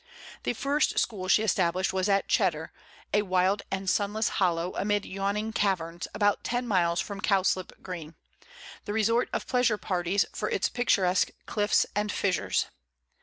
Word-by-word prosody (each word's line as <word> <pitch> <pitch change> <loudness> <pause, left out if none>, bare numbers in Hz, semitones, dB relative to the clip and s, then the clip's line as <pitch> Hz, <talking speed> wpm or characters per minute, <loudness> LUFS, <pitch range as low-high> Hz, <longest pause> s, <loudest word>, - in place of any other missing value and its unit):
The - - -1
first 280 +5 0
school 190 -4 -1
she 210 +3 +4
established 185 -2 +1
was 190 +1 0
at 195 -1 +2
Cheddar, 160 -6 +1 0.4
a 210 - +4
wild 185 +1 +1
and 195 0 -3
sunless 210 +3 +1
hollow, 175 -1 +1
amid 205 0 0
yawning 200 +3 -2
caverns, 175 -5 -1
about 205 -1 +2
ten 245 +1 -2
miles 170 -5 +2
from 200 0 -4
Cowslip 190 -2 0
Green, 170 -4 -7 0.7
the 205 - -3
resort 230 +3 +2
of - - -2
pleasure 245 -4 +2
parties 185 0 0
for 210 - -2
its 190 - 0
picturesque 190 -7 +2 0.2
cliffs 205 -1 +2
and 210 0 0
fissures. 190 -3 0
195 Hz, 150 wpm, -28 LUFS, 185-210 Hz, 0.7 s, she